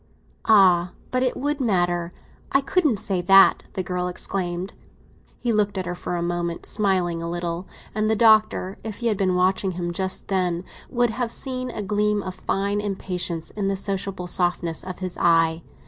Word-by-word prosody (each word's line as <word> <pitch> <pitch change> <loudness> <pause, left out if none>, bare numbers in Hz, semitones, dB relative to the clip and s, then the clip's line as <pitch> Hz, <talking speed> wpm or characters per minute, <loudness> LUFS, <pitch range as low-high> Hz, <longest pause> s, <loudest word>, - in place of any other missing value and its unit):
'" - - -35
"Ah, 180 -4 +5 0.2
but 255 - +1
it 255 -1 0
would 290 +1 -1
matter; 175 -6 +1 0.4
I 275 - +4
couldn't 300 - +2
say 190 -2 -1
that!" 195 +2 +6
the 185 - -2
girl 180 0 -2
exclaimed. 180 0 -3 0.7
He 240 -2 0
looked 205 -2 +1
at 185 - -2
her 175 - -3
for 175 0 -4
a 170 - -1
moment, 170 -1 -2
smiling 185 -5 0
a 170 - -4
little; 175 +1 -3 0.3
and 215 +1 0
the 220 - +3
Doctor, 215 -3 +3
if 220 -1 -5
he 235 - -2
had 210 - 0
been 185 -2 +1
watching 185 +1 +2
him 175 0 -3
just 190 +1 -2
then, 180 -3 0 0.3
would 240 -2 +1
have 240 0 -2
seen 255 -1 -3
a 215 -3 -4
gleam 210 +1 +1
of 185 - -5
fine 200 +2 -1
impatience 180 -4 -3
in 205 -2 -2
the 195 0 0
sociable 195 -1 -3
softness 175 -2 0
of 185 -1 -6
his 185 -1 -5
eye. 165 -1 +3
190 Hz, 185 wpm, -24 LUFS, 175-210 Hz, 0.7 s, that